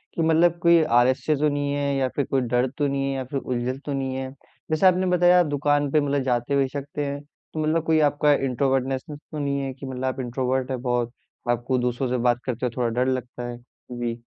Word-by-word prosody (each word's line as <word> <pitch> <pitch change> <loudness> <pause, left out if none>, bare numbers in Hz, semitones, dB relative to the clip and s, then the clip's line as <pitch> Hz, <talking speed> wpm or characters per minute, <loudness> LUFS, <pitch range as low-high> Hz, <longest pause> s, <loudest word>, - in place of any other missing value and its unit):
कि 165 - 0
मतलब 165 +1 +3
कोई 170 -1 +6
आलस्य 130 +3 +3
तो 150 +1 +2
नहीं 145 0 -1
है, 140 -1 0
या 135 -1 +1
फिर 140 - 0
कोई 135 -1 0
डर 125 +1 +1
तो 145 -1 +1
नहीं 140 0 -1
है, - - -2
या 130 - -2
फिर 135 +1 -3
उलझन 125 +1 -3
तो 145 - -2
नहीं 135 -1 -2
है। 130 0 -4 0.4
जैसे 155 +5 +2
आपने 185 +1 +3
बताया, 180 +1 +5
आप 175 - +4
दुकान 145 -1 +1
पे 155 - +4
मतलब 140 -1 0
जाते 125 +2 0
भी 135 -1 +3
सकते 145 +1 -4
हैं, 140 0 -4 0.3
तो 155 - -4
मतलब 155 +1 +1
कोई 160 -1 +3
आपका 145 +1 +3
इंट्रोवर्टनेस 135 +2 -1
तो 155 - -4
नहीं 140 -1 -1
है, 135 -1 -3
कि 135 +1 -10
मतलब 130 0 -4
आप 130 +1 -2
इंट्रोवर्ट 130 +1 -1
हैं 125 -2 -3
बहुत, 120 -2 0 0.4
आपको 120 +2 +1
दूसरों 125 +1 -1
से 125 - 0
बात 120 0 +2
करते 125 -1 -2
हुए 120 - -1
थोड़ा 120 -1 +1 0.2
डर - - -1
लगता 125 -1 -4
है। 120 0 -6 0.3
जी। 120 -1 -4
135 Hz, 235 wpm, -24 LUFS, 125-145 Hz, 0.4 s, कोई